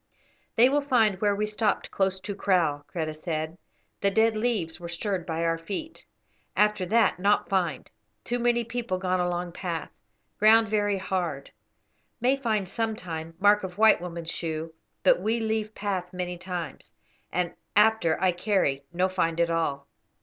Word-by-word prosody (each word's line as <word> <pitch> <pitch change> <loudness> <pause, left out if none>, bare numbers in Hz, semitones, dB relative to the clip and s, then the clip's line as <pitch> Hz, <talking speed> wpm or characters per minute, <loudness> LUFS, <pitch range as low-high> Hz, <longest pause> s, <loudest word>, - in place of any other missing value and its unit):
"They 235 +3 +7
will 290 +2 +2
find 225 -9 +2
where 205 -1 +3
we 210 +1 0
stopped 210 0 -1
close 190 -1 0
to 205 - -4
kraal," 170 -8 +1
Kreta 160 -3 -2
said; 160 +1 -4 0.4
"the 200 - +2
dead 220 +2 +3
leaves 215 -8 -1
were 170 -1 -7
stirred 180 +1 -3
by 165 0 -2
our 165 0 +1
feet; 210 - -6 0.5
after 210 -3 +2
that 220 -2 +3
not 200 +2 +2
find, 180 -6 -1 0.4
too 245 0 -2
many 240 0 +2
people 235 -4 -3
gone 185 0 0
along 175 0 -1
path; 170 -2 -4 0.5
ground 220 +1 +6
very 205 -1 +1
hard; 175 -7 -3 0.7
may 250 +3 +3
find, 220 -7 -1
sometime, 175 -8 -4
mark 205 +1 +5
of 180 -1 -5
the - - -24
white 220 -4 +5
woman's 170 -1 -5
shoe; 160 -1 -4 0.3
but - - +5
we 225 +2 0
leave 220 -1 -2
path 190 -3 -3
many 180 -1 -4
times, 175 -4 -6 0.4
and 180 -1 -1 0.2
after 210 -6 +4
I 185 0 +3
carry 175 -7 0
no 180 +2 +1
find 170 -3 -1
at 170 0 +2
all. 140 -4 -1
190 Hz, 165 wpm, -27 LUFS, 170-215 Hz, 0.7 s, They